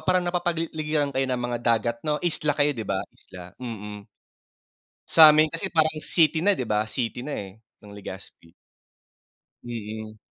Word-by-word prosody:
parang 185 -1 +1
napapaligiran 160 -4 -1
kayo 135 0 0
ng 125 -1 -1
mga 120 0 -2
dagat 115 0 +1
no 150 - +2
isla 150 -3 0
kayo 145 0 +3
di 115 -5 -6
ba, 95 - -1
Isla? 90 -1 -13
Mm. 105 -4 -6 1.0
Samin 155 -1 +7
kasi 165 +5 -2
parang 155 -1 +3
city 160 +1 +2
na 195 +5 +3
di 130 - -3
ba? 105 -2 0
City 120 +3 -4
na 150 - -3
eh, 100 +1 -7 0.2
ng 105 - -13
Legazpi. 95 -4 -11 1.1
Mm. 110 -2 -7
130 Hz, 150 wpm, -25 LUFS, 110-155 Hz, 1.1 s, Samin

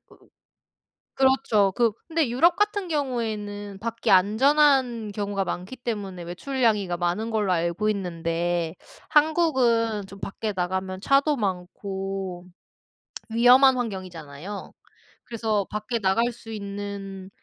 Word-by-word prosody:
으 - - -22 1.0
그렇죠. 260 -7 +3
그 235 -2 +3 0.2
근데 325 -5 +1
유럽 330 +9 +4
같은 415 -1 0
경우에는 215 - -3
밖이 230 +2 -2
안전한 245 +3 +4
경우가 200 -1 -2
많기 180 +6 -5
때문에 205 -8 -5
외출냥이가 205 0 0
많은 180 +6 -1
걸로 210 -3 +1
알고 170 +4 0
있는데 170 -3 -1 0.3
한국은 255 - +2
좀 195 +1 -12
밖에 210 +2 -4
나가면 185 +1 -2
차도 275 +5 +3
많고 190 -1 -4 0.9
위험한 250 +3 +6
환경이잖아요. 185 - -6 0.5
그래서 220 -3 -1
밖에 215 +3 -2
나갈 225 +4 +2
수 230 -1 -12
있는 200 -2 -6
210 Hz, 255 characters per minute, -25 LUFS, 190-245 Hz, 1.0 s, 위험한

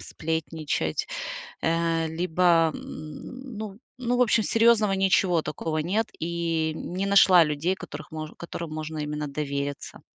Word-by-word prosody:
сплетничать, 160 -1 -2 0.6
э 165 0 +1
либо 165 0 +3
м, 245 - -8
ну 210 -2 -6 0.2
ну, 245 0 0
в - - +3
общем, 225 -1 +3
серьёзного 225 -3 +4
ничего 190 -3 +3
такого 155 +1 -3
нет, 205 +8 0
и 165 -1 -1
не 185 +4 -3
нашла 190 -3 +7
людей, 150 +5 0
которых 155 -4 -9
мо 155 -1 -6
которым 170 -1 -6
можно 155 0 -5
именно 150 0 -3
довериться. 140 -1 -4
165 Hz, 130 wpm, -26 LUFS, 155-195 Hz, 0.6 s, нашла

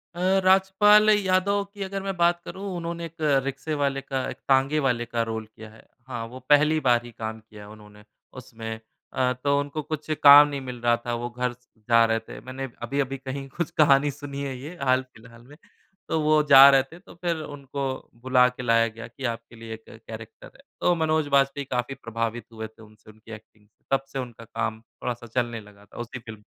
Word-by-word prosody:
अ, - - -7 0.2
राजपाल 195 +3 +5
यादव 200 -1 +2
की 200 -2 -5
अगर 195 0 -4
मैं 195 -1 -3
बात 175 0 +3
करूँ, 195 +1 -7
उन्होंने 170 0 -4
एक 165 0 -11 0.3
रिक्शे 140 +3 -4
वाले 135 -1 0
का 135 -1 -3
एक - - -7
तांगे 135 +3 +3
वाले 120 -2 +1
का 115 0 -2
रोल 110 0 -4
किया 110 0 -11
है। 110 +1 -17 0.2
हाँ, 120 -3 -5
वो 125 +3 -10
पहली 150 +2 +5
बार 120 -1 +4
ही 120 - -10
काम 110 0 -6
किया 105 -2 -14
उन्होंने 105 -1 -15 0.4
उसमें। 115 -2 -7 0.4
अ, 130 -1 +1
तो 140 0 +2
उनको 145 +2 -3
कुछ 155 +1 -6
काम 145 +1 +10
नहीं 140 -1 -4
मिल 125 -2 -7
रहा 120 0 +3
था, 120 - -2
वो 120 +1 -3
घर 125 0 -2
से 120 -2 -29
जा 115 0 +6
रहे 115 0 +1
थे। 115 - -11
मैंने 130 +1 -6 0.2
अभी-अभी 135 0 -1
कहीं 135 +1 -6
कुछ 170 -2 -2
कहानी 145 0 +5
सुनी 140 0 -7
है 135 -2 -4
ये, 150 +7 -9
हाल 130 -1 +2
फिलहाल 115 +1 -16
में। 145 +2 -15 0.5
तो 160 - +1
वो 155 0 +4
जा 135 0 +10
रहे 135 -1 +5
थे, 160 +6 -15
तो 195 - -16
फिर 170 -2 0 0.2
उनको 140 0 -6 0.4
बुला 130 -1 +5
के 125 0 -9
लाया 115 -1 +3
गया 115 +1 -9
कि 120 +3 -13
आपके 115 0 -5
लिए 115 0 -8
एक 110 0 -10
कैरेक्टर 110 0 -11
है। - - -18 0.2
तो 175 - +3
मनोज 160 -2 +1
बाजपेयी 140 +1 0
काफ़ी 125 +2 -2
प्रभावित 115 +1 -3
हुए 110 -1 -6
थे 110 +1 -21
उनसे, 110 0 -17
उनकी 110 +1 -16
एक्टिंग 110 -1 -13
से। 105 - -46
तब 135 0 +2
से 135 - -2
उनका 120 -3 -8
काम 110 0 -4
थोड़ा-सा 120 +1 -7
चलने 120 -2 -1
लगा 105 -1 -18
था, - - -17
उसी 120 +1 -6
फिल्म 110 -2 -11
130 Hz, 210 wpm, -25 LUFS, 115-145 Hz, 0.5 s, काम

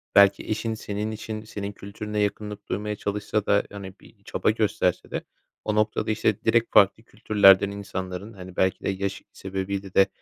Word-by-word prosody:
belki 100 0 +6
eşin 110 +1 -1
senin 105 0 -3
için 110 0 -5
senin 100 -2 -5
kültürüne 105 +1 -5
yakınlık 105 0 -2
duymaya 105 +1 -2
çalışsa 105 +1 -2
da, 100 0 +3
hani, 100 -2 -9
bir - - -20
çaba - - 0
gösterse - - 0
de - - -3 0.4
o 105 - 0
noktada 105 0 +1
işte 110 -1 +1
direkt 115 +1 +2
farklı 105 +2 +5
kültürlerden 100 -4 +5
insanların, 100 0 -5
hani, 95 -2 -10
belki 95 0 +1
de - - 0
yaşı 95 0 -3
sebebiyle 95 0 -4
de, 95 - +6
100 Hz, 165 wpm, -25 LUFS, 95-105 Hz, 0.4 s, belki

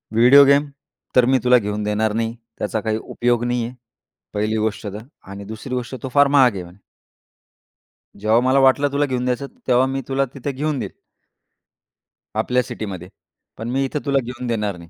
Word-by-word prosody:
"Video 125 +5 +8
game 140 +1 +4 0.5
तर 125 -1 +6
मी 130 +1 +3
तुला 125 0 +6
घेऊन 105 -2 -2
देणार 105 +1 0
नाही. 115 +1 -2 0.2
त्याचा 110 - -2
काही 110 0 -1
उपयोग 120 -1 0
नाही 120 -1 0
आहे. 120 +2 -8 0.6
पहिली 105 +1 -1
गोष्ट 110 0 -2
तर. 100 +1 -6 0.3
आणि 100 +1 -9
दुसरी 110 +5 -7
गोष्ट 125 +1 -4
तो 130 - -3
फार 145 0 +6
महाग 125 -4 +6
आहे 95 - -4
म्हणे" 90 +3 -15 1.4
जेव्हा 110 +3 +3
मला 130 +2 +3
वाटलं 135 +2 +4
तुला 145 +1 +1
घेऊन 125 -2 -2
द्यायचं, 125 +2 -1 0.2
तेव्हा 125 0 +4
मी 135 0 -2
तुला 135 0 +1
तिथे 140 +1 -4
घेऊन 145 +1 -2
देईल. - - -5 1.4
आपल्या 125 0 +1
सिटीमध्ये. 95 -6 -7 0.5
पण 115 +2 -5
मी 135 +2 0
इथे 145 +2 -3
तुला 140 -1 +2
घेऊन 125 +1 -6
देणार 105 -5 -1
नाही. 85 -1 -13
120 Hz, 180 wpm, -21 LUFS, 110-135 Hz, 1.4 s, Video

